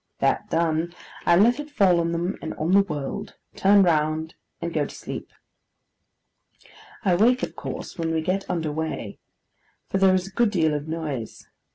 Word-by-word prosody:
That - - 0
done, 165 +1 0 0.3
I 170 - +6
let 230 +9 +4
it 295 0 -6
fall 195 -11 +4
on 170 0 0
them, 175 +3 -1
and 160 - -5
on 160 +3 -1
the 200 +1 +7
world: 160 +3 -5 0.2
turn 200 +1 +5
round: 160 -1 +1 0.3
and - - -4
go - - +1
to - - -7
sleep. - - -7 1.8
I 185 - +4
wake, 240 +8 +4
of - - -3
course, - - -7
when 165 -1 -1
we 160 -1 0
get 185 +4 -2
under 165 -4 -1
weigh, 155 -9 -4 0.7
for 195 - 0
there 190 -1 +5
is 185 -1 0
a 195 - -9
good 235 +3 +2
deal 160 -6 +2
of 150 +1 -3
noise. 155 -8 -5
170 Hz, 180 wpm, -24 LUFS, 160-195 Hz, 1.8 s, the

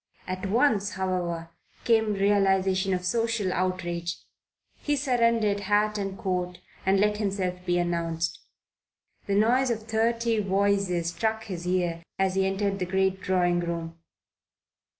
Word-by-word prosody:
At 185 +1 -3
once, 215 -3 +2
however, 175 -3 -2 0.3
came 220 -2 +3
realization 195 -1 +2
of 180 0 -4
social 225 -1 0
outrage. 175 -2 -2 0.6
He 295 - 0
surrendered 230 -6 +2
hat 210 +1 +1
and 195 -1 -3
coat 180 -2 -2 0.3
and 195 0 +4
let 210 +1 +2
himself 190 -3 -2
be 175 0 +2
announced. 170 -1 -1 0.9
The 200 - +1
noise 245 +5 +3
of 220 -2 -2
thirty 230 +1 +1
voices 195 -3 +1
struck 220 +5 -1
his 180 -5 -6
ear 175 -2 0 0.2
as 190 -1 +1
he 190 0 +2
entered 195 0 -1
the 180 - -1
great 190 0 +1
drawing 180 -1 +2
room. 170 -1 -4
195 Hz, 130 wpm, -27 LUFS, 180-210 Hz, 0.9 s, and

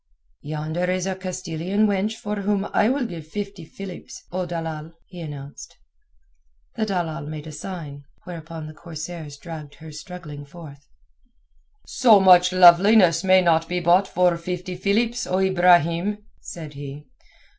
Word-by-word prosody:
"Yonder 155 +3 -3
is 185 0 -1
a 190 - -1
Castilian 185 +1 -2
wench 205 +1 0
for 210 -1 -5
whom 200 0 0
I 210 - +3
will 265 0 0
give 165 -7 -7
fifty 200 0 -6
Philips, 190 +2 -10
O 180 0 -2
dalal," 165 -2 -5
he 180 -2 -11
announced. 145 -3 -9 1.0
The 220 -1 -1
datal 170 -6 -3
made 155 0 -7
a 155 - -8
sign, 150 -3 -8 0.2
whereupon 165 -2 -8
the 155 - -9
corsairs 160 -2 -8
dragged 155 -2 -9
her 160 -1 -11
struggling 150 -2 -9
forth. 140 -2 -13 1.0
"So 230 -6 +5
much 180 -1 +6
loveliness 180 0 +6
may 185 0 +5
not 165 -1 +2
be 180 0 0
bought 175 +3 +4
for 180 -1 +2
fifty 180 +1 -5
Philips, 225 +6 0
O 185 - 0
Ibrahim," 180 +1 +3
said 155 -3 -9
he. 145 +1 -8
175 Hz, 145 wpm, -23 LUFS, 155-190 Hz, 1.0 s, much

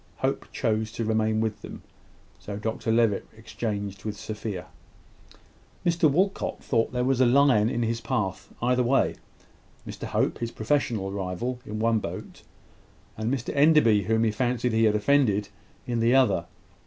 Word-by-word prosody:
Hope - - -2
chose 110 -1 -1
to 115 - -3
remain 110 0 +1
with 110 -2 -2
them; - - -9 0.6
so 100 -1 -6
Dr 110 +1 -2
Levitt 115 -3 +2
exchanged 100 -3 -5
with 105 -1 -4
Sophia. 105 -4 -5 1.2
Mr 170 -2 +3
Walcot 190 +7 0
thought 115 -3 +1
there 125 0 -1
was 130 0 +2
a - - +6
lion 125 -4 +4
in 120 -2 -1
his 115 0 -1
path 95 -3 -3
either 125 +1 +2
way 125 +3 +2 0.7
Mr - - -6
Hope, - - 0
his 115 - -2
professional 110 -4 -1
rival, 100 +6 -3
in 105 - -4
one 115 0 +2
boat, - - -7 0.7
and 110 +2 -2
Mr 135 -1 -3
Enderby, 140 - +5
whom 110 +2 +2
he 110 - +2
fancied 125 +1 -1
he 110 0 +3
had 105 -1 +3
offended, 105 -4 +2 0.4
in 120 -1 -1
the 115 +3 +3
other. 100 -10 +3
115 Hz, 155 wpm, -26 LUFS, 105-125 Hz, 1.2 s, a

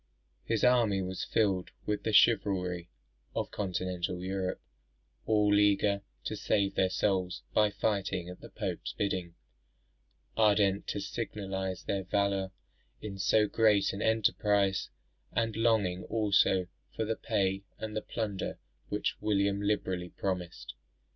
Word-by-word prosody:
His 115 -2 -1
army 115 -6 +4
was 95 0 -4
filled 95 -5 +1 0.2
with 105 -1 -1
the 110 - -1
chivalry 95 -5 +3 0.5
of - - -2
continental 90 -2 -2
Europe, 95 0 -2 0.7
all 105 -2 +3
eager 100 -1 +3 0.2
to - - -3
save 100 -2 +1
their 95 - +2
souls 95 -2 0
by 105 -1 +4
fighting 100 -3 -1
at 90 0 -9
the - - -10
Pope's - - -4
bidding, 90 -4 -2 1.0
ardent 100 -2 +3
to - - -2
signalise 95 -2 -4
their 100 -1 -1
valour 100 0 0 0.5
in 100 -2 -7
so 105 +2 +4
great 105 -2 +3
an 100 - -5
enterprise, 105 -3 +2 0.4
and 115 -1 0
longing 105 -6 +2
also 100 -4 +3 0.3
for 110 - -1
the 110 +1 -1
pay 95 -4 0 0.2
and 110 0 -5
the 110 - -1
plunder 105 -4 -3 0.3
which - - -1
William 100 -1 +1
liberally 95 -4 -1
promised. 90 -9 -4
100 Hz, 130 wpm, -31 LUFS, 95-105 Hz, 1.0 s, army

